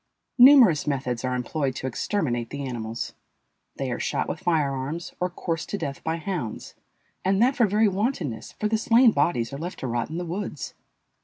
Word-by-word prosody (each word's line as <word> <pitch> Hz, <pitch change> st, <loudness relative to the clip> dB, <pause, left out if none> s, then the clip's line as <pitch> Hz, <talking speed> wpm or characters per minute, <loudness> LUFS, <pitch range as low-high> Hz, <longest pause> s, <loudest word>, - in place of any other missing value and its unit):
Numerous 245 Hz, -, +8 dB
methods 130 Hz, -4 st, -1 dB
are 125 Hz, 0 st, 0 dB
employed 130 Hz, +1 st, -2 dB
to 130 Hz, -, -5 dB
exterminate 125 Hz, -, -1 dB
the 140 Hz, 0 st, -5 dB
animals; 115 Hz, -2 st, -4 dB, 0.6 s
they 135 Hz, -2 st, -3 dB
are 120 Hz, -, -3 dB
shot -, -, -1 dB
with -, -, -4 dB
fire 160 Hz, -7 st, +1 dB
arms 140 Hz, +6 st, -4 dB
or 180 Hz, -, 0 dB
coursed 165 Hz, -2 st, -4 dB
to 205 Hz, -, -2 dB
death 140 Hz, -7 st, -5 dB
by 160 Hz, 0 st, -1 dB
hounds, 165 Hz, -, -4 dB, 0.5 s
and 195 Hz, +1 st, +2 dB
that 255 Hz, +4 st, +4 dB
for 235 Hz, -, +4 dB
very 210 Hz, +2 st, +3 dB
wantonness, 190 Hz, -, -2 dB
for 210 Hz, -, -2 dB
the 220 Hz, 0 st, +1 dB
slain 235 Hz, +1 st, +5 dB
bodies 120 Hz, -, 0 dB
are 140 Hz, -, -5 dB
left 175 Hz, +3 st, -5 dB
to -, -, -3 dB
rot 120 Hz, 0 st, -2 dB
in 160 Hz, -, -5 dB
the 175 Hz, -, -3 dB
woods. 175 Hz, -3 st, -5 dB
160 Hz, 190 wpm, -25 LUFS, 130-195 Hz, 0.6 s, Numerous